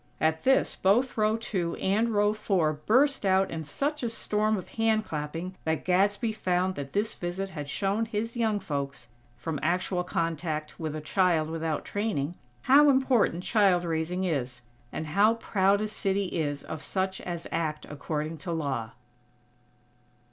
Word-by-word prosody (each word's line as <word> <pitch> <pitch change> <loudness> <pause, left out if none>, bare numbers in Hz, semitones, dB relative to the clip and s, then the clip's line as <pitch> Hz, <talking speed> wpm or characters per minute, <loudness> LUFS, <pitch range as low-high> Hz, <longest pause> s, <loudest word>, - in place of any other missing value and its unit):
At 160 0 +1
this 265 +1 +3
both 235 +7 +2
row 215 0 +2
two 185 -7 -2
and 215 +5 +1
row 205 -1 +3
four 190 -7 +1
burst 255 - +2
out 190 0 +3
in 160 -1 -4
such 285 - -2
a 240 - -1
storm 215 -1 0
of 185 - -7
hand 220 -1 +1
clapping 165 +4 -4
that 160 -1 -1
Gadsby 200 +5 +2
found 185 -3 0
that 140 -4 -7
this 210 +2 0
visit 185 +2 -4
had 145 -5 -6
shown 200 +7 0
his 225 +2 -3
young 220 -3 +1
folks, 140 - -4 0.3
from 155 +3 -3
actual 180 +3 0
contact 160 -3 -2
with 155 -2 -3
a 155 - -4
child 160 -1 +2
without 160 -2 -2
training, 205 -8 -1 0.3
how 290 +3 +7
important 260 -9 +3
child 190 -5 +3
raising 165 +3 -1
is; 130 -8 -2 0.3
and 160 - -4
how 205 +9 +4
proud 200 -3 +2
a 215 - 0
city 200 -2 -1
is 145 -5 -2
of 160 -2 -6
such 190 +2 -2
as 170 -2 -5
act 155 -2 -2
according 155 +2 -4
to 175 +3 -5
law. 135 -8 -2
185 Hz, 160 wpm, -28 LUFS, 155-215 Hz, 0.3 s, how